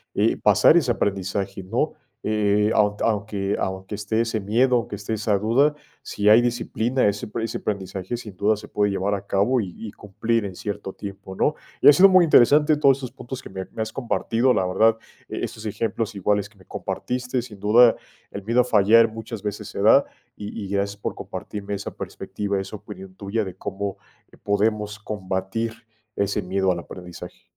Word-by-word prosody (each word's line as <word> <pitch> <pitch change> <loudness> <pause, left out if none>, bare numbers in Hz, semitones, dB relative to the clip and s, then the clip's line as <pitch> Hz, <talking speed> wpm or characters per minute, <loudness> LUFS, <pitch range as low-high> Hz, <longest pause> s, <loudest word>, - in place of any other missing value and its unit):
eh, 110 +3 +2
pasar 105 - +5
ese 155 -8 +3
aprendizaje, 95 -2 -2
¿no?, 115 +11 -1 0.3
eh, 105 -1 +2
aun 105 -1 +3
aunque 100 -2 -1
aunque 95 +1 -3
esté 105 +2 -2
ese 115 -2 0
miedo, 120 +6 +2
aunque 115 -3 -2
esté 100 +2 -4
esa 105 -1 +1
duda, 125 +8 +3 0.3
si 105 - -3
hay 110 +3 +8
disciplina, 120 0 0
ese 100 0 -2
pre 110 +1 -3
ese 115 - -4
aprendizaje 95 +1 -4
sin 105 -4 -10
duda 105 +3 +2
se 105 0 -10
puede 105 -1 0
llevar 100 +1 0
a 100 - -7
cabo 115 +6 +2
y 95 -4 -6
y 110 -2 -8
cumplir 110 +3 -2
en 100 -2 -5
cierto 100 -2 -5
tiempo, 100 -1 -9
¿no?, 150 - +1 0.3
y - - +6
ha 145 - +11
sido 190 +7 +7
muy 185 -2 +6
interesante 150 +2 +5
todos 140 -3 +4
estos 130 -3 -7
puntos 130 +1 -7
que - - -11
me 95 0 -6
me - - -5
has 110 0 -4
compartido, 125 0 +1
la 95 - +1
verdad, 110 +5 +3 0.3
esos 110 - -5
ejemplos 115 +1 -2
iguales 100 0 0
que 105 - -26
me 95 - -19
compartiste, 125 +5 -3
sin 115 -4 -11
duda, 115 +3 +6 0.4
el 100 - -7
miedo 115 +4 +1
a - - +1
fallar 115 0 +5
muchas 110 -1 -7
veces 105 0 -5
se - - -5
da, 110 +7 +6 0.3
y 105 +2 -7
y - - -6
gracias 100 +1 -2
por - - -4
compartirme 100 0 -6
esa 100 - -5
perspectiva, 100 -1 -4
esa 95 +2 -6
opinión 95 -2 -11
tuya 100 +3 -2
de 95 -2 -7
cómo 100 +1 -4 0.5
podemos 105 +1 0
combatir 100 +2 -3 0.5
ese 100 +1 0
miedo 95 +1 0
al 85 - -5
aprendizaje. 90 0 -10
105 Hz, 185 wpm, -23 LUFS, 100-115 Hz, 0.5 s, ha